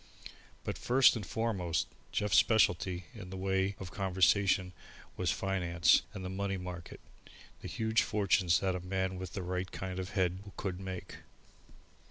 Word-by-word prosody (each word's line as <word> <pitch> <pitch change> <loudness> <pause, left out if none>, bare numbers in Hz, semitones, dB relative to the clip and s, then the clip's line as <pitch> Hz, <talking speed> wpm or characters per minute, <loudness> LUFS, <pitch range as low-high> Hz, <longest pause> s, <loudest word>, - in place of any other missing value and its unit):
But - - -4
first 130 +2 +5
and 110 - -3
foremost, 95 -4 -1 0.3
Jeff's 105 -1 +4
specialty 90 -5 +2
in 100 -6 -9
the 95 - -6
way 95 +1 0
of 95 -2 -7
conversation 95 0 +2 0.4
was - - -1
finance 90 -3 +3
and 95 -4 -7
the - - -2
money 100 +1 -2
market, 90 -2 -7 0.6
the - - -6
huge 110 +1 +1
fortunes 100 -5 +2
that 95 -1 +1
a - - -2
man 95 +1 -2
with 95 -2 -6
the 95 - -4
right 90 +1 -3
kind 95 -1 -5
of 95 0 -4
head 90 -1 +1 0.2
could 95 -2 -3
make. 95 -2 -6
95 Hz, 155 wpm, -32 LUFS, 90-100 Hz, 0.6 s, first